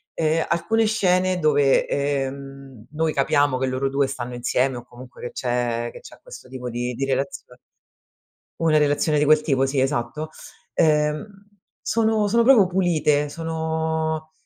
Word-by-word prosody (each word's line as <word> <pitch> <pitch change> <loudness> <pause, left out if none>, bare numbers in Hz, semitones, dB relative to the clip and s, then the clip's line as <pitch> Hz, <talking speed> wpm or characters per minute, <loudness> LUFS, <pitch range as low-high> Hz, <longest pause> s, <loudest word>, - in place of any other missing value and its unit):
ehm, 160 0 +1
alcune 225 +6 +1
scene 185 -4 +1
dove, 145 -4 +3
ehm, 135 -3 -4
noi 155 +1 -1
capiamo 145 -1 +2
che 130 - 0
loro 130 +1 -1
2 140 0 +1
stanno 125 -1 -6
insieme 125 +1 0
o 120 - -8
comunque 125 +1 -14
che 120 - -6
c'è 120 -1 -1
che - - -10
c'è - - -13
questo - - -12
tipo 125 -1 -6
di 120 +1 -3
di 135 - -3
relazione 135 -1 -3 1.0
una 160 -2 +3
relazione 150 +1 +2
di 150 - +2
quel 155 +1 +5
tipo, 135 -3 +1
sì 135 0 -1
esatto, 135 +3 -2 0.5
uhm, 150 +1 +2 0.6
sono 220 -2 +1
sono 235 +3 +3
proprio 230 -6 +6
pulite 165 -5 +1
sono, 160 0 -3
145 Hz, 150 wpm, -23 LUFS, 130-160 Hz, 1.0 s, proprio